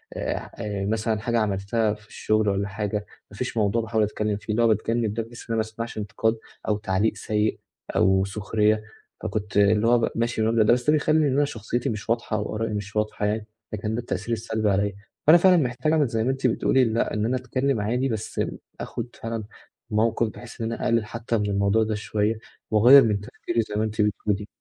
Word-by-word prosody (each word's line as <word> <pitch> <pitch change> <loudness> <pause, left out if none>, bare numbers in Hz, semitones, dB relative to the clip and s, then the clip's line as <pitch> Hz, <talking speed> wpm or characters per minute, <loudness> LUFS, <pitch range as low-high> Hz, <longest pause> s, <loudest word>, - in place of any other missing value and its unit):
آآ 100 -2 -4
مثلًا 110 0 0
حاجة 120 0 0
عملتها 105 +1 0
في 105 -1 -14
الشغل 110 -1 0
والّا 100 +1 0
حاجة، 105 +1 -3 0.3
ما 100 - -12
فيش 125 -2 -3
موضوع 110 +2 +2
باحاول 110 -1 0
أتكلم 105 0 -1
فيه، 105 +1 -4
اللي 120 +2 +2
هو - - +5
باتكلم 110 0 +1
ده 115 0 -2
بس 120 - -11
ما 115 - +1
أسمعش 110 +1 -6
انتقاد 110 +3 0 0.3
أو 105 - +2
تعليق 105 +1 0
سيء 105 0 -1 0.4
أو 95 0 +4
سخرية، 105 +2 +1 0.4
فكنت 105 -1 -3
اللي 105 +2 +4
هو 120 0 +5
م - - +1
ماشي 115 -1 0
بالمبدأ 110 0 +3
ده، 115 - +5
بس 125 +2 -1
ده 150 - +6
بيخلّي 155 +1 +3
إن 130 - +1
أنا 145 +1 +3
شخصيتي 120 -1 -3
مش 105 0 -5
واضحة 115 -2 0
أو 105 +1 -3
آرائي 110 0 -2
مش 105 0 -5
واضحة 105 -1 -1
يعني، 105 +1 -1 0.3
فكان 105 +1 -2
ده - - -1
التأثير 120 0 -3
السلبي 110 -1 -1
عليَّ. 100 0 0 0.3
فأنا 165 +3 +9
فعلًا 180 0 +5
محتاج 130 +1 0
أعمل 150 -4 +3
زي 115 -1 -1
ما 130 - +2
أنتِ 135 -1 0
بتقولي، 130 +2 +3
لأ، 115 +1 0
إن 105 - 0
أنا 130 +3 +1
اتكلم 130 -1 -1
عادي 125 +5 0
بس 110 -2 -3 0.4
آخد 125 - -5
فعلًا 115 -1 -3 0.5
موقِف 110 +1 +2
بحيث 120 +1 -11
إن 115 0 -1
أنا - - -5
أقلل 115 -1 +2
حتى 115 +1 -2
من 105 0 -1
الموضوع 100 +2 +2
ده 110 -1 -1
شوية 105 +1 -1 0.3
وأغيّر 125 +6 +8
من 105 -3 +1
تفكري 115 +2 -2
زي 105 - -6
ما 105 - +1
أنتِ 110 0 -1
بتقولي. 105 0 0
110 Hz, 205 wpm, -25 LUFS, 105-115 Hz, 0.5 s, فأنا